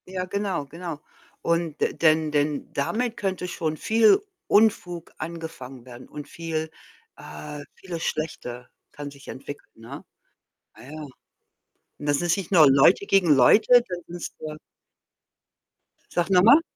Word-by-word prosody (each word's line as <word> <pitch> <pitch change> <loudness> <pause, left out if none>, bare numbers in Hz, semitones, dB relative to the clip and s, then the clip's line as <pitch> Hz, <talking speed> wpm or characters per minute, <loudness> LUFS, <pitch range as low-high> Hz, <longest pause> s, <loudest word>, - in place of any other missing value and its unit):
Ja, 185 0 -4
genau, 195 -5 -2
genau. 165 +1 -7 0.4
Und 170 -2 -1
d - - 0
denn 155 -1 +2
denn 145 0 -1
damit 225 - -1
könnte 190 -2 -2
schon 160 -3 -3
viel 225 - +4 0.3
Unfug 180 -6 +2
angefangen 155 -7 -8
werden 125 0 -12
und 145 -1 -8
viel, 160 -1 -4 0.5
äh 75 - -9
vieles 170 -3 -7
Schlechte 125 -6 -4 0.2
kann 145 -1 -8
sich 140 0 -16
entwickeln, 140 +2 -9
ne? 115 +1 -10 0.7
Ja, - - -13
ja. 155 0 -8 0.9
Und - - -7
das 145 +1 +1
ist 175 -1 +2
nicht 195 -2 -6
nur 160 -6 +7
Leute 140 +9 +5
gegen 195 -4 +3
Leute, 215 - +6
dann 175 -1 -6
sind's, 175 0 -7
äh 155 -1 -6 1.5
Sag 175 +1 -1
noch 180 -2 +5
mal? 275 +10 +8
165 Hz, 140 wpm, -25 LUFS, 145-180 Hz, 1.5 s, mal